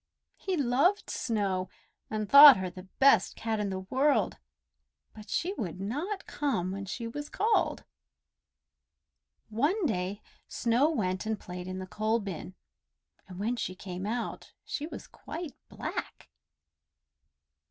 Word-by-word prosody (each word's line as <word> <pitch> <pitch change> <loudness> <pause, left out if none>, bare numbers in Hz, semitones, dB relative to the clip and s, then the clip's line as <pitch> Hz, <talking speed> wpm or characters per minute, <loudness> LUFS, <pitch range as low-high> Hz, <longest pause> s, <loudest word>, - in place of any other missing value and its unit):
He 375 -2 -2
loved 285 - +2
Snow 195 -5 -1 0.4
and 215 -1 -2
thought 280 +2 +11
her 185 -1 -3
the 185 +1 -11
best 265 -8 +5
cat 225 -1 -2
in 205 -1 -1
the 190 -1 -3
world, 265 +10 +1 0.7
but 215 -1 -12
she 365 +3 -1
would 180 -3 -4
not 305 - -3
come 220 -12 -1
when 195 +1 -5
she 230 +4 -5
was 290 +6 -6
called. 440 +1 +1 1.7
One 295 - +1
day 200 -4 -2 0.2
Snow 245 +5 +2
went 190 - -1
and 220 -2 -1
played 180 0 -7
in 185 0 -5
the 185 - -5
coal 215 +4 0
bin, 190 -2 -6 0.7
and 185 -1 -10
when 220 +5 -1
she 185 - -3
came 185 0 -6
out 235 +2 -4
she 295 - -4
was - - -8
quite 325 -4 -8 0.2
black. - - -6
220 Hz, 135 wpm, -29 LUFS, 190-280 Hz, 1.7 s, thought